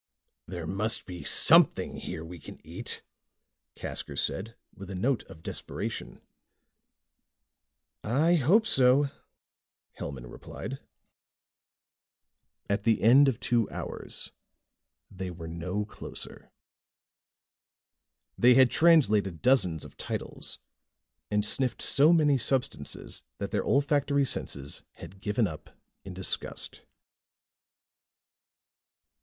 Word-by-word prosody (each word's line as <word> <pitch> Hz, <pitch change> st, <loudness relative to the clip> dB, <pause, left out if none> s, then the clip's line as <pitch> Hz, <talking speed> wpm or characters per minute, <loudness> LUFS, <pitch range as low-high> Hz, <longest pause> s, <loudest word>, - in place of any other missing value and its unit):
"There 85 Hz, -2 st, -6 dB
must 105 Hz, +6 st, +1 dB
be 90 Hz, -2 st, -8 dB
something -, -, +4 dB
here 80 Hz, -, -6 dB
we 85 Hz, +1 st, -9 dB
can -, -, -11 dB
eat," -, -, -5 dB, 0.7 s
Casker -, -, -6 dB
said 110 Hz, +4 st, -2 dB, 0.2 s
with 95 Hz, -1 st, -10 dB
a 95 Hz, -, -5 dB
note 120 Hz, +6 st, +1 dB
of 80 Hz, -, -14 dB
desperation. -, -, -5 dB, 1.8 s
"I 145 Hz, +10 st, +2 dB
hope 175 Hz, -, +4 dB
so," 135 Hz, -, +4 dB, 0.9 s
Hellman 65 Hz, -3 st, -6 dB
replied. -, -, -8 dB, 1.9 s
At 100 Hz, +1 st, 0 dB
the 115 Hz, -2 st, +2 dB
end 130 Hz, +6 st, +7 dB
of 130 Hz, -5 st, 0 dB
two 120 Hz, -3 st, +1 dB
hours, -, -, -5 dB, 0.8 s
they 95 Hz, -1 st, -5 dB
were 85 Hz, -2 st, -8 dB
no 90 Hz, +5 st, -3 dB
closer. 105 Hz, -, -9 dB, 1.9 s
They 125 Hz, +1 st, +6 dB
had 130 Hz, -2 st, +6 dB
translated 110 Hz, -, +4 dB
dozens 95 Hz, -, +2 dB
of -, -, -14 dB
titles -, -, -5 dB, 0.7 s
and 105 Hz, 0 st, +1 dB
sniffed 125 Hz, +2 st, +1 dB
so 145 Hz, +4 st, +5 dB
many 150 Hz, -5 st, +4 dB
substances 130 Hz, +1 st, -2 dB, 0.2 s
that -, -, -4 dB
their -, -, +1 dB
olfactory 140 Hz, 0 st, +2 dB
senses 70 Hz, -, -3 dB
had 95 Hz, 0 st, -12 dB
given 105 Hz, +3 st, +1 dB
up 80 Hz, -5 st, -7 dB, 0.3 s
in 95 Hz, -1 st, -8 dB
disgust. 95 Hz, 0 st, -2 dB
110 Hz, 105 wpm, -28 LUFS, 90-135 Hz, 1.9 s, end